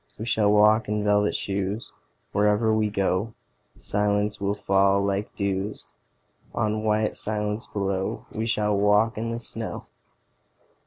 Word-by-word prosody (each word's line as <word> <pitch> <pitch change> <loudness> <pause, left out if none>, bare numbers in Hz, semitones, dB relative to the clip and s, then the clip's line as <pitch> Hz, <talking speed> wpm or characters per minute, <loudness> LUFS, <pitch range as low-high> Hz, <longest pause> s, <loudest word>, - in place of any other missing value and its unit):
We 110 - -5
shall 105 -3 +2
walk 105 +1 +4
in 105 0 0
velvet 105 0 +2
shoes: 100 +2 -3 0.4
Wherever 105 +2 +2
we 110 -1 +1
go 100 +2 -1 0.4
Silence 105 0 0
will 100 +1 0
fall 100 0 +2
like 100 +1 -2
dews 100 0 -3 0.6
On 110 0 0
white 110 0 +1
silence 105 +1 -1
below. 95 -2 -2
We 110 +1 -2
shall 105 -2 +1
walk 105 +3 +3
in 115 +1 -2
the 115 0 -3
snow. 115 -1 -6
105 Hz, 135 wpm, -25 LUFS, 100-110 Hz, 0.6 s, walk